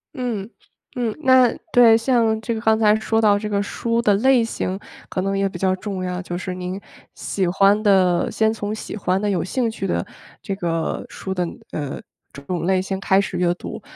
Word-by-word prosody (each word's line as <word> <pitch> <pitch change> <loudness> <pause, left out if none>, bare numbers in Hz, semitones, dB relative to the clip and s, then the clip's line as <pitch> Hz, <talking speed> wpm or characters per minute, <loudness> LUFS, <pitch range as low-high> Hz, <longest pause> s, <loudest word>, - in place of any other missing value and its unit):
嗯， 230 -6 -3 0.5
嗯， 240 -3 -1
那 260 -4 +5 0.2
对， 235 -2 +7
像 230 -2 +2
这 230 +1 -2
个 225 - -3
刚 220 0 +3
才 215 -1 +4
说 225 0 0
到 205 -2 +4
这 210 - -4
个 200 -1 0
书 230 +3 -1
的 210 -3 +3
类 255 +3 +4
型 190 -4 -3 0.3
可 185 - -2
能 195 +1 -1
也 195 0 +1
比 190 - -7
较 185 +1 +1
重 195 -2 -5
要， 180 0 -3
就 175 -1 -5
是 185 0 -4
您 180 +1 -5 0.4
喜 190 -2 -2
欢 195 +3 +3
的 185 -4 +3
先 220 0 +1
从 210 -1 -4
喜 215 - -7
欢 190 -1 0
的、 210 - 0
有 195 - 0
兴 235 +4 -1
趣 195 -3 -4
的 - - -1 0.4
这 200 - -4
个 165 -4 -2
书 190 - -6
的 180 -1 -1 0.3
呃， 145 -3 -4 0.3
这 140 - -10
种 170 +3 -3
类 190 0 +2
型 190 0 -4
开 195 0 +3
始 195 - -4
阅 175 -1 +2
读， 175 - -8
200 Hz, 225 characters per minute, -21 LUFS, 185-225 Hz, 0.5 s, 对